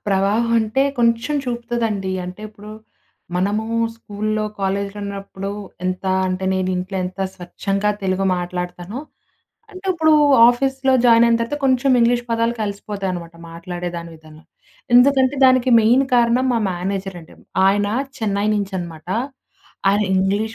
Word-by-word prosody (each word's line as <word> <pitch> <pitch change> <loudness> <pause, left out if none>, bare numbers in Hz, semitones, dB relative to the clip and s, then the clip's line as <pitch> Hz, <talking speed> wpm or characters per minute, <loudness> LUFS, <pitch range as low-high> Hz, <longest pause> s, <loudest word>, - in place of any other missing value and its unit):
ప్రవాహం 205 +4 +1
అంటే, 220 +4 +1 0.2
కొంచెం 235 +4 +1
చూపుతదండి. 235 -5 -2
అంటే 180 +3 -8
ఇప్పుడు, 210 0 -13 0.7
మనము 205 +4 0 0.3
స్కూల్‌లో, 215 0 -3 0.2
కాలేజ్‌లో 200 +1 -2
ఉన్నప్పుడు, 195 -1 -6 0.3
ఎంత 185 +1 -2 0.2
అంటే 185 +1 -3
నేను, 185 0 -1
ఇంట్లో 185 +2 -4
ఎంత 185 +2 -7 0.2
స్వచ్ఛంగా 195 +3 -2
తెలుగు 190 0 0
మాట్లాడతానో, 180 +4 -5 0.7
అంటే 375 -1 -10
ఇప్పుడు 315 -3 +3 0.4
ఆఫీస్‌లో 265 +2 +1
జాయిన్ 235 -1 +6
అయిన 235 0 +3
తర్వాత 230 +5 -2
కొంచెం 265 +1 +2
ఇంగ్లీష్ 240 +1 +3
పదాలు 230 +1 +1
కలిసిపోతాయనమాట. 195 -4 -4 0.2
మాట్లాడే 175 +1 -6
దాని 170 0 -7
విధంలో. 155 0 -17 0.5
ఎందుకంటే, 260 +1 +5
దానికి 255 -1 +4
మెయిన్ 240 +5 +4
కారణం 240 +2 +3
మా 235 - +1
మేనేజర్ 190 +1 -4
అండి. 160 - -16 0.3
ఆయన, 205 +1 +2 0.3
చెన్నై 205 -2 -1
నుంచి 200 -1 -2
అనమాట. 170 -2 -8 0.8
ఆయన 205 +2 +3
ఇంగ్లీష్ 200 +4 0
205 Hz, 130 wpm, -20 LUFS, 185-235 Hz, 0.8 s, జాయిన్